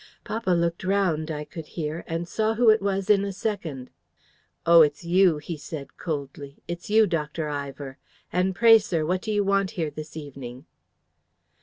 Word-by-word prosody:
Papa 225 -3 -3
looked 170 -1 +1
round, 185 -5 +1
I 150 -1 -3
could 160 -1 -9
hear, 160 +1 -3
and 165 +1 -3
saw 220 +4 0
who 230 -1 +6
it 215 - +2
was 195 -1 -1
in 205 -2 +4
a 200 - -2
second. 175 - -4 0.7
"'Oh, 170 0 +8
it's 150 +1 +2
you!' 180 -1 +4
he 155 +2 -6
said, 145 -1 -8
coldly. 140 -3 -5
'It's 175 +2 -6
you, 220 +1 +5
Dr. 160 -3 -2
Ivor. 140 -2 -6 0.3
And 185 +1 +1
pray, 225 +2 +7
sir, 170 -7 -2
what 180 +3 0
do 220 - -3
you 205 -1 +2
want 195 -1 +1
here 160 -3 -1
this 155 +1 -8
evening?'" 135 -3 -9
170 Hz, 175 wpm, -25 LUFS, 150-195 Hz, 0.7 s, Oh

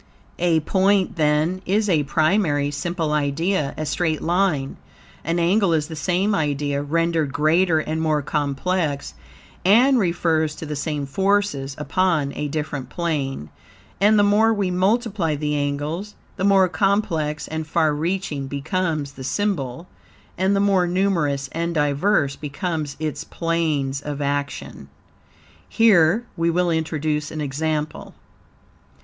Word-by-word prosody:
A 170 -2 +2
point, 195 +3 +2
then, 155 +3 +1
is 210 +3 +1
a 165 -6 +3
primary, 155 -2 +1
simple 160 +1 -2
idea, 150 +2 0
a 155 - -3
straight 155 +1 -1
line. 170 -6 0 0.5
An 165 +2 -1
angle 180 +2 +2
is 155 -1 0
the 160 - -6
same 185 +6 0
idea, 145 -4 -1
rendered 165 0 0
greater 160 +4 +3
and 155 +1 -2
more 155 -2 +1
complex, 145 +1 -1 0.5
and 245 +7 +5
refers 165 -4 +1
to - - -7
the 150 0 -4
same 145 0 -3
forces 190 -4 0
upon 155 -2 0
a 150 - -2
different 145 -2 -4
plane, 140 - -3 0.5
and 210 +3 +5
the 205 - +5
more 210 +2 +4
we 200 -4 0
multiply 190 -3 +1
the 150 0 -2
angles 145 +7 -3 0.2
the - - -4
more 195 -1 +5
complex 170 -4 0
and 160 0 -4
far 155 -1 +2
reaching 155 -3 -2
becomes 155 +1 -2
the 135 - -10
symbol 155 -2 -2 0.5
and 190 +2 +1
the - - +2
more 195 -3 +3
numerous 170 -7 0
and 170 +1 -2
diverse 145 0 +1
become 155 +1 -3
its 155 -2 -3
planes 155 -5 -1
of 145 -1 -5
action. 145 0 -3 0.8
Here 215 -1 +4
we 165 0 +1
will 175 +1 +1
introduce 155 -2 -1
an 155 - -6
example. 150 +2 -3
160 Hz, 135 wpm, -22 LUFS, 145-185 Hz, 0.8 s, and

